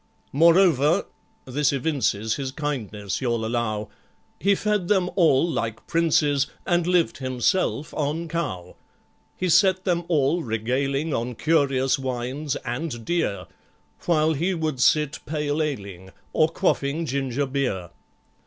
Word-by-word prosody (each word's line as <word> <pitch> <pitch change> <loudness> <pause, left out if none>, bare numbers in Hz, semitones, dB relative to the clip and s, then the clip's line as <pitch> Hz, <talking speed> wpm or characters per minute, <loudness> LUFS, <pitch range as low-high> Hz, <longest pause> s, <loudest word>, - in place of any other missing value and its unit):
Moreover,—this 155 -4 +2
evinces 130 -6 0
His 135 -2 -3
kindness, 110 - -4
you'll 120 -3 0
allow,— 110 -2 -2 0.5
He 200 +1 +3
fed 210 -3 -1
them 185 -3 +2
all 165 -5 +4
like 115 -9 -3
princes, 150 -4 +2 0.2
And 175 -1 +1
lived 180 -4 +2
himself 140 - 0
on 155 +3 -2
cow. 95 - -4 0.6
He 185 - -1
set 185 +1 +4
them 175 -2 0
all 160 +1 +2
regaling 135 +6 -1
On 120 +1 -2
curious 135 -3 +2
wines, 130 +3 -3
and 120 -1 -4
dear, 165 -13 -1 0.6
While 160 -2 +3
he 175 +6 0
would 155 -6 -2
sit 150 +1 +3
pale 150 0 -1
ale 140 -10 -2
ing, 95 -1 -11 0.2
Or 155 0 +3
quaffing 165 -3 0
ginger 140 -1 -1
beer. 125 -11 -2
145 Hz, 125 wpm, -24 LUFS, 125-165 Hz, 0.6 s, all